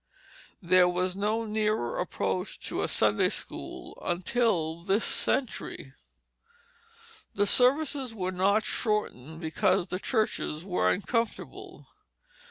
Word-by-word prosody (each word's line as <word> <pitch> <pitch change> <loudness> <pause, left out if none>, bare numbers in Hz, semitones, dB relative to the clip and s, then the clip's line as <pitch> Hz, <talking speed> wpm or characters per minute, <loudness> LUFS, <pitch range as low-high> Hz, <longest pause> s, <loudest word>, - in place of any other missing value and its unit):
There 180 +1 +5
was 180 +1 -1
no 215 +3 0
nearer 215 - 0
approach 95 -2 -2
to - - -2
a - - 0
Sunday - - +3
school - - -6
until 175 -3 0
this 195 +4 +1
century. 220 - -2 1.4
The 205 - +3
services 265 +3 +3
were 185 -4 -3
not 195 +4 +2
shortened 160 - -2
because 160 +1 +1
the 180 - -2
churches 210 - -1
were 180 -2 +1
uncomfortable. 230 +3 -2
195 Hz, 105 wpm, -28 LUFS, 175-220 Hz, 1.4 s, There